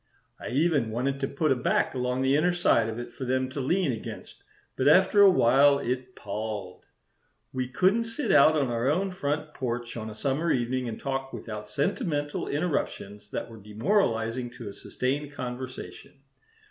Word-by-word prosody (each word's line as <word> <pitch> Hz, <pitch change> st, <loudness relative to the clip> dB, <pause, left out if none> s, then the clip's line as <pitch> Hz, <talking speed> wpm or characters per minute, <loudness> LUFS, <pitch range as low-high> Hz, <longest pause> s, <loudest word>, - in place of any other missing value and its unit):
I -, -, -6 dB
even 145 Hz, -3 st, +2 dB
wanted 130 Hz, +5 st, -1 dB
to 135 Hz, -, -1 dB
put 150 Hz, +3 st, 0 dB
a -, -, +4 dB
back 125 Hz, -, +1 dB
along 125 Hz, 0 st, -1 dB
the 135 Hz, +1 st, +3 dB
inner 175 Hz, +4 st, +3 dB
side 115 Hz, -10 st, +3 dB
of 110 Hz, -, -5 dB
it 120 Hz, 0 st, -7 dB
for -, -, -7 dB
them 130 Hz, 0 st, 0 dB
to 140 Hz, -, -5 dB
lean 170 Hz, +4 st, +1 dB
against, 115 Hz, -, -8 dB, 0.3 s
but 130 Hz, -, +1 dB
after 190 Hz, +6 st, +6 dB
a 200 Hz, -, +9 dB
while 140 Hz, -3 st, +5 dB
it 125 Hz, -1 st, -3 dB
palled. 105 Hz, -2 st, -5 dB, 0.7 s
We 130 Hz, -1 st, -2 dB
couldn't 190 Hz, -, +2 dB
sit 230 Hz, +2 st, -2 dB
out 155 Hz, +3 st, +6 dB
on 140 Hz, -4 st, +1 dB
our 120 Hz, +2 st, 0 dB
own 190 Hz, +6 st, +1 dB
front 150 Hz, -3 st, -3 dB
porch 120 Hz, -2 st, -4 dB
on 110 Hz, -2 st, -5 dB
a 105 Hz, -, -9 dB
summer 140 Hz, +7 st, -1 dB
evening 125 Hz, -1 st, 0 dB
and 110 Hz, -, -6 dB
talk 135 Hz, -1 st, -3 dB
without 105 Hz, -2 st, -7 dB
sentimental 145 Hz, -, -1 dB
interruptions 105 Hz, -, -3 dB
that -, -, -4 dB
were 115 Hz, -, -12 dB
demoralizing 115 Hz, -, 0 dB
to 115 Hz, -4 st, -7 dB
a -, -, -9 dB
sustained 140 Hz, +6 st, -3 dB
conversation. 130 Hz, -1 st, -7 dB
130 Hz, 175 wpm, -27 LUFS, 120-150 Hz, 0.7 s, a